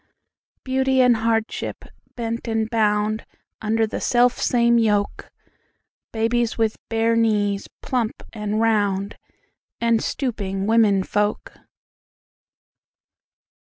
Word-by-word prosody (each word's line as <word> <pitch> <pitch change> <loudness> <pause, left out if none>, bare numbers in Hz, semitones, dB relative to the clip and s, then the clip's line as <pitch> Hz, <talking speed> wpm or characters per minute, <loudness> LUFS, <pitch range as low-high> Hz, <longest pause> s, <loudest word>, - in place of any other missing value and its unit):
Beauty 265 0 +1
and 250 -2 +5
hardship, 225 0 -2 0.3
bent 230 0 -4
and 225 -1 0
boundUnder 215 0 -1
the - - -5
selfsame 240 -1 +3
yoke:Babies 225 +2 -3
with 225 -1 0
bare 225 0 +1
knees 205 -3 +1 0.2
plump 240 -4 -2
and 210 -2 -3
roundAnd 215 +1 -1
stooping 200 -7 -3
women 215 -3 +3
folk. 205 +2 -1
225 Hz, 80 wpm, -22 LUFS, 210-235 Hz, 0.3 s, and